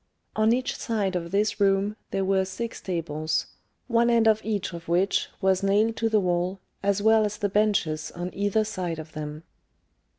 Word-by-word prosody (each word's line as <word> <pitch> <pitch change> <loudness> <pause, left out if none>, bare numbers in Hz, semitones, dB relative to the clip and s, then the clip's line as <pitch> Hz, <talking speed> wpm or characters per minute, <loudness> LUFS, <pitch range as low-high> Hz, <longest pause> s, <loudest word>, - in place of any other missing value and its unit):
On 215 +1 +3
each 255 +2 0
side 205 -5 -1
of 170 -1 -3
this 205 +4 0
room 200 +1 +2
there 195 0 -1
were 190 0 +2
six 210 +5 -5
tables, 155 -3 -2 0.4
one 235 -1 +3
end 230 -1 +4
of 220 0 +4
each 205 -4 -2
of 170 0 -8
which 180 +4 +1
was 190 -1 +2
nailed 210 +3 +2
to 225 - +1
the 220 -1 +3
wall, 180 0 0 0.2
as 200 0 +1
well 220 0 +5
as 210 0 -2
the 205 - -1
benches 200 -7 +1
on 175 +1 -5
either 205 +2 +1
side 185 -6 -3
of 160 0 -8
them. 155 0 -6
195 Hz, 185 wpm, -26 LUFS, 175-215 Hz, 0.4 s, well